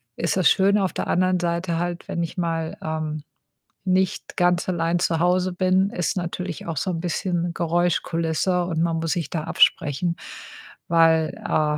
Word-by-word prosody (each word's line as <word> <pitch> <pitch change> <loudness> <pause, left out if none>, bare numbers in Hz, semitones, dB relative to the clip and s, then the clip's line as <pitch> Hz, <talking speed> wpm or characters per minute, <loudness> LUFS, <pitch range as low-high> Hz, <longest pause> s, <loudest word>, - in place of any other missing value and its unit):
ist 170 - -1
das 185 - +5
schön, 200 +2 +4
auf 190 -2 0
der - - -3
anderen 185 0 +2
Seite 170 0 -1
halt, 175 0 -3
wenn 170 - -2
ich 170 - -6
mal, 165 -2 -2
ähm, 155 -1 -3 0.6
nicht 185 0 0
ganz 175 0 +2
allein 170 -1 0
zu 165 -2 0
Hause 180 +1 +2
bin, 185 +2 +2
ist 180 -3 -2
natürlich 180 0 -4
auch 165 -2 -4
so 140 +7 -1
'n 170 -2 -2
bisschen 175 0 -2
Geräuschkulisse 170 +1 0
und 165 -2 -1
man 165 -1 +1
muss 165 0 -2
sich 170 -5 -2
da 160 -3 -3
absprechen, 160 +1 +2 0.7
weil, 165 -1 +3
äh, 150 -1 +1
170 Hz, 170 wpm, -23 LUFS, 165-180 Hz, 0.7 s, das